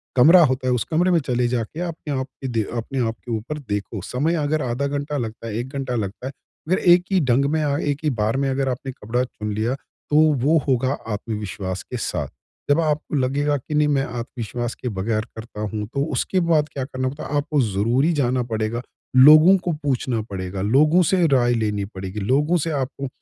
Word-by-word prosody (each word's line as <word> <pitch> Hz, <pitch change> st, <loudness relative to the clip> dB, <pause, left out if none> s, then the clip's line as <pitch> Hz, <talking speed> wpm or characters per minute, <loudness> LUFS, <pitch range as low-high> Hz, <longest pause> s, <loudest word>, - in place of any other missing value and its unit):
कमरा 165 Hz, +8 st, +7 dB
होता 130 Hz, -1 st, -1 dB
है 125 Hz, -, +3 dB
उस 120 Hz, -, 0 dB
कमरे 175 Hz, +3 st, +3 dB
में 170 Hz, -, +4 dB
चले 125 Hz, -4 st, 0 dB
जाके 120 Hz, +4 st, -3 dB
अपने 165 Hz, -4 st, -4 dB
आप 130 Hz, -, -3 dB, 0.2 s
दे 115 Hz, -4 st, 0 dB
अपने 130 Hz, +3 st, -3 dB
आप 120 Hz, -, +1 dB
आपके 115 Hz, +1 st, -6 dB
ऊपर 115 Hz, +7 st, -3 dB
देखो। 105 Hz, 0 st, -3 dB
समय 145 Hz, -, -1 dB
अगर 150 Hz, +1 st, 0 dB
आधा 130 Hz, +3 st, -1 dB
घंटा 145 Hz, +1 st, -3 dB
लगता 115 Hz, -2 st, -5 dB
है, 105 Hz, -, -4 dB
1 120 Hz, +2 st, -4 dB
घंटा 135 Hz, -3 st, -3 dB
लगता 110 Hz, +3 st, -4 dB
है। -, -, -4 dB, 0.4 s
मगर 185 Hz, -, +3 dB
एक 175 Hz, 0 st, +5 dB
ही 190 Hz, -, +4 dB
ढंग 130 Hz, 0 st, +2 dB
में 155 Hz, 0 st, +1 dB
अ, 145 Hz, -1 st, 0 dB
एक 145 Hz, -2 st, -1 dB
ही 155 Hz, -, +2 dB
बार 115 Hz, -1 st, 0 dB
में 135 Hz, 0 st, 0 dB
अगर 135 Hz, 0 st, 0 dB
आपने 130 Hz, +1 st, -4 dB
कपड़ा 125 Hz, 0 st, -2 dB
चुन 105 Hz, -4 st, -5 dB
लिया 110 Hz, +5 st, -1 dB, 0.3 s
तो 150 Hz, -, +3 dB, 0.3 s
वो 160 Hz, +3 st, +5 dB
होगा 130 Hz, -1 st, +2 dB, 0.2 s
आत्मविश्वास 100 Hz, -4 st, -4 dB
के -, -, -6 dB
साथ। -, -, -2 dB, 0.4 s
जब 145 Hz, +3 st, +4 dB
आपको 155 Hz, -1 st, -1 dB
लगेगा 145 Hz, +2 st, +1 dB
कि 140 Hz, +3 st, -8 dB
नहीं 150 Hz, 0 st, +3 dB
मैं 140 Hz, -2 st, +2 dB
आत्मविश्वास 120 Hz, 0 st, -5 dB
के 125 Hz, -, -4 dB
बगैर 110 Hz, +2 st, -2 dB
करता 110 Hz, -1 st, -8 dB
हूँ 105 Hz, 0 st, -3 dB
तो 140 Hz, -, 0 dB
उसके 185 Hz, +8 st, 0 dB
बाद 160 Hz, -3 st, +2 dB
क्या 135 Hz, -, -3 dB
करना 130 Hz, -1 st, -3 dB
पड़ता 145 Hz, +3 st, -8 dB
है? 145 Hz, -, -3 dB
आपको 150 Hz, -1 st, +1 dB
ज़रूरी 115 Hz, -, +1 dB
जाना 130 Hz, -4 st, +1 dB
पड़ेगा। 115 Hz, 0 st, -2 dB, 0.3 s
लोगों 155 Hz, +8 st, +8 dB
को 180 Hz, -1 st, -2 dB
पूछना 130 Hz, -4 st, 0 dB
पड़ेगा। 95 Hz, 0 st, -4 dB
लोगों 150 Hz, -, +4 dB
से 180 Hz, +1 st, +2 dB
राय 125 Hz, -4 st, +3 dB
लेनी 105 Hz, -3 st, -1 dB
पड़ेगी। 95 Hz, 0 st, -7 dB
लोगों 145 Hz, -, +2 dB
से 165 Hz, 0 st, -2 dB
आपको 140 Hz, -1 st, -3 dB
130 Hz, 210 wpm, -22 LUFS, 115-150 Hz, 0.4 s, लोगों